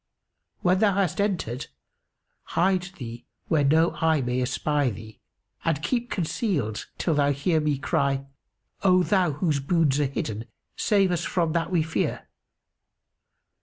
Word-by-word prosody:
When 185 +1 +3
thou 205 -3 +3
hast 195 0 +1
entered, 160 - -2 0.9
hide 185 +2 +3 0.2
thee 120 -4 -8 0.2
where 155 -3 +3
no 160 +4 +4
eye 160 -1 +3
may 125 0 -1
espy 145 +2 0
thee 110 0 -9 0.4
and 160 -2 0
keep 245 -1 -1
concealed 160 - -2
till 165 - 0
thou 145 -1 +3
hear 155 +4 +1
me 150 -2 0
cry, 135 0 0 0.6
'O 185 -2 +4
Thou 180 -5 +2
whose 150 0 0
boons 145 -1 +2
are 145 - +2
hidden, 115 -4 -4 0.3
save 195 -3 +2
us 170 -2 0
from 165 -2 0
that 165 -1 0
we 175 -4 +2
fear! 160 0 -2
160 Hz, 140 wpm, -25 LUFS, 140-180 Hz, 0.9 s, no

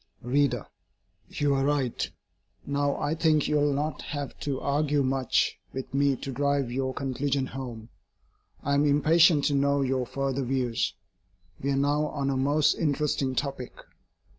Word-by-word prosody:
READER: 140 +3 +1 0.6
You 145 -1 0
are 135 0 +1
right. 140 -4 0 0.6
Now, 140 0 0
I 145 +1 -1
think 160 -2 +2
you 150 - +2
will 145 0 +2
not 145 +2 -2
have 145 -2 -5
to 140 -3 -2
argue 145 0 +1
much 130 -2 +1
with 130 0 -6
me 140 0 +3
to 135 - -6
drive 140 -1 0
your 130 +1 -1
conclusions 135 0 -2
home. 120 -4 -7 0.7
I 140 - 0
am 140 +1 +3
impatient 155 +2 +5
to 145 - +2
know 140 0 +2
your 130 -1 -1
further 135 0 -2
views. 125 -2 -1 0.7
We 140 - -1
are 140 - +1
now 145 +2 +1
on 140 -2 -2
a - - -1
most 145 +3 +3
interesting 145 -3 0
topic. 135 -2 -3
140 Hz, 155 wpm, -27 LUFS, 130-145 Hz, 0.7 s, impatient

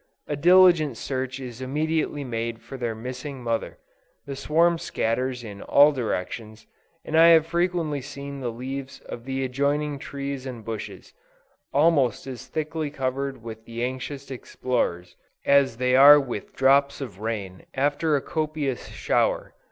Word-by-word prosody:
A 145 - -2
diligent 170 -4 +5
search 130 0 -3
is 125 -2 -8
immediately 150 +2 -1
made 115 -2 -3
for - - -9
their 120 -3 -3
missing 125 +3 -7
mother; 115 -1 -2 0.5
the 140 - -5
swarm 165 +5 +2
scatters 125 0 -1
in 100 -3 -8
all 145 +1 +6
directions, 110 -3 -4 0.4
and 155 - -3
I 165 +1 +8
have 165 -2 +7
frequently 170 -3 0
seen 140 +1 -7
the 125 -3 -3
leaves 135 +3 -6
of 120 - -9
the 135 0 -2
adjoining 140 +2 -1
trees 140 -1 -5
and 120 -4 -8
bushes, 110 -2 -7 0.6
almost 145 -4 +3
as 130 -1 -8
thickly 155 +1 -3
covered 135 -2 -3
with 110 -1 -8
the 115 +1 -5
anxious 130 +2 -5
explorers, 120 -8 -2 0.3
as 140 -4 +4
they 125 0 +2
are 145 +2 +9
with 125 -7 -6
drops 140 +1 +3
of 115 -9 -7
rain 105 -4 -5
after 145 +3 +1
a 140 - +1
copious 155 -5 -2
shower. - - 0
135 Hz, 145 wpm, -25 LUFS, 120-145 Hz, 0.6 s, are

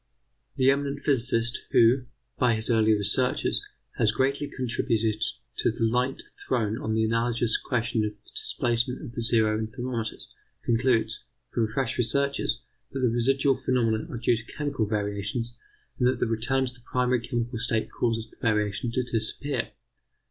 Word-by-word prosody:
The 130 0 +5
eminent 140 0 -2
physicist, 120 -3 +1
who, 125 +3 +5 0.3
by 120 -2 +4
his 110 +2 +2
earlier 110 -1 +4
researches, 105 +5 +1 0.4
has 105 - +4
greatly 140 +5 0
contributed 115 -3 0 0.4
to - - +2
the - - -2
light 125 +4 +1 0.2
thrown 115 -3 0
on 110 0 -1
the 110 - +2
analogous 115 0 +1
question 115 -2 0
of 105 0 -2
the - - -12
displacement 125 - -1
of - - -7
the 120 -1 -4
zero 110 -2 +3
in 110 - -2
thermometers, 115 0 -5 0.3
concludes, 115 -1 +1 0.3
from 115 -2 +1
fresh 125 +4 -2
researches, 140 +4 +2 0.3
that 135 - -3
the 125 - +3
residual 135 +3 +2
phenomena 115 -4 +1
are - - -5
due 120 +1 +2
to 110 +1 -10
chemical 145 -7 -1
variations, 105 +3 -2 0.5
and 125 - +4
that 125 -1 +1
the - - +2
return 115 +4 +1
to 125 - -4
the 125 - -18
primary 125 -1 +2
chemical 120 -1 -2
state 115 -2 -1
causes 115 -2 -1
the - - -21
variation 105 0 0
to 125 - +1
disappear. 120 +5 -1
120 Hz, 160 wpm, -27 LUFS, 110-130 Hz, 0.5 s, The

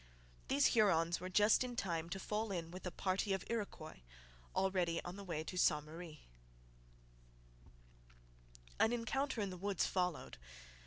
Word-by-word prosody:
These 280 +1 +4
Hurons 175 -7 +4
were 185 +1 -5
just 210 +6 +5
in 245 -1 -4
time 170 -6 -2
to 195 +2 -3
fall 210 +2 -2
in 165 -3 -3
with 185 +1 -6
a - - -3
party 195 +2 0
of 190 - -2
Iroquois, 200 - -4 0.6
already 180 -3 +1
on 175 +1 -6
the 200 - -8
way 165 -5 -3
to 180 +3 -6
Ste 150 -4 +4
Marie. 160 0 -9 2.6
An 225 - +4
encounter 240 +1 -1
in 200 -2 -1
the 180 - -6
woods 195 0 0
followed. 180 - -1
185 Hz, 150 wpm, -38 LUFS, 170-210 Hz, 2.6 s, just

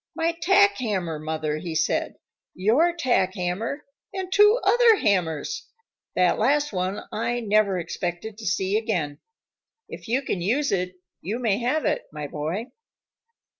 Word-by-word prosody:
"My 330 +1 0
tack 405 0 +4
hammer, 185 -10 -2
Mother," 155 -1 -2
he 165 -1 -5
said, - - 0 0.4
"your 240 - +3
tack 245 - +1
hammer, 195 +11 -3 0.3
and 380 -1 -4
two 420 +3 +6
other 475 -2 +6
hammers! 200 - -1 0.5
That 180 -1 +3
last 290 +3 +2
one 185 +2 -2
I 235 +2 -1
never 210 -3 +2
expected 175 +4 -4
to 215 - -6
see 190 +3 +1
again. 175 -11 -2 0.7
If - - -10
you 255 +5 +1
can 190 -8 -2
use 260 +11 +1
it, 180 -1 -1 0.3
you 210 +7 -3
may 225 -4 0
have 255 +6 0
it, 300 - -1
my 150 -1 -5
boy." 160 - -4
215 Hz, 145 wpm, -25 LUFS, 180-290 Hz, 0.7 s, two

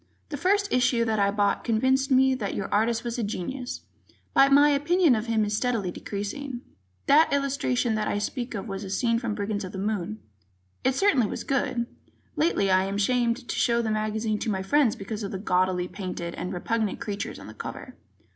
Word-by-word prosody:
The 290 - -4
first 400 +6 +1
issue 245 -2 +3
that 220 -2 0
I 200 0 +3
bought 205 0 +1
convinced 260 +4 +2
me 265 0 +5
that 215 -6 -3
your 200 - -3
artist 225 +2 +2
was 240 0 -3
a - - 0
genius, 245 +5 -4 0.5
but 275 +1 +5
my 285 +1 +7
opinion 310 +2 +3
of 220 0 -1
him 220 -2 +2
is 210 0 -1
steadily 220 -5 0
decreasing. 240 +8 -5 0.4
That 310 +3 +5
illustration 275 -4 0
that 215 -1 -1
I - - 0
speak 240 +4 -3
of 200 +2 -5
was 195 0 -5
a 195 - -6
scene 230 +4 +1
from 230 -3 -3
"Brigands 205 0 -2
of 185 - -7
the - - -5
Moon." 205 0 -2 0.7
It 260 0 +2
certainly 275 - +3
was - - -5
good. 250 -3 0 0.5
Lately, 300 - +2
I 185 0 +4
am 195 +1 -3
ashamed 240 +3 +1
to - - -3
show 235 -1 +2
the 220 - -1
magazine 215 0 -1
to 230 - -2
my 190 -2 -1
friends 275 +2 +3
because 210 +2 -6
of 200 - -3
the 195 - -3
gaudily 185 -2 +1
painted 180 -3 -5
and 180 - -5
repugnant 215 +3 -1
creatures 205 -1 -4
on - - -11
the - - -10
cover. - - -8
225 Hz, 205 wpm, -26 LUFS, 200-260 Hz, 0.7 s, my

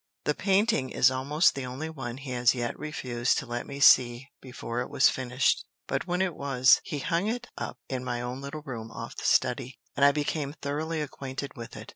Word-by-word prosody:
The - - +1
painting 195 - +2
is - - +4
almost 140 +6 +2
the 135 -2 -5
only 130 +5 -5
one 135 -6 -6
he 135 -1 -7
has 125 0 +3
yet 120 -1 -2
refused 125 -5 -1
to - - -2
let 120 0 -4
me 140 0 -7
see 125 -1 +5
before 125 -2 -5
it 125 - -5
was 130 - +5
finished; 130 0 +1 0.2
but, - - -2
when 180 +1 +1
it 180 -3 -1
was, 135 -3 +4
he 150 - -4
hung 170 +7 0
it 245 +2 -3
up - - -5
in 130 -1 -3
my 125 -1 -2
own 125 +2 -5
little 140 +2 -7
room 115 -5 -6
off - - -8
the - - -6
study, 130 0 +1 0.2
and 140 - +1
I 140 - +8
became 145 0 -2
thoroughly 155 +3 -2
acquainted 140 -1 -6
with 115 -1 -8
it. - - -9
135 Hz, 210 wpm, -28 LUFS, 125-150 Hz, 0.2 s, I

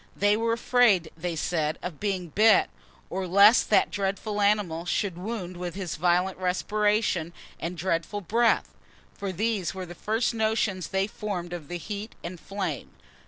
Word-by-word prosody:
They 205 +1 +3
were 230 +1 +1
afraid, 230 -8 +3
they 170 +1 -3
said, 155 -1 -1
of 175 -5 -5
being 190 -4 -2
bit, 215 +4 +4 0.4
or 185 0 -2
lest 200 +6 +6
that 210 - +4
dreadful 205 +1 -2
animal 200 -5 +1
should 185 +1 -1
wound 185 -1 -5
with 175 -1 -5
his 190 -3 -4
violent 180 +3 +1
respiration 185 -1 0 0.3
and 175 +1 -4
dreadful 175 +4 -1
breath; 230 +5 +2 0.4
for 200 -2 -4
these 200 -1 -1
were 185 -1 -5
the 175 - -9
first 220 +6 -1
notions 220 -5 0
they 195 0 0
formed 190 -4 -5
of 165 -5 -6
the 175 - -4
heat 205 +5 -6
and 175 +1 -6
flame. 190 -8 -4
190 Hz, 160 wpm, -27 LUFS, 175-210 Hz, 0.4 s, lest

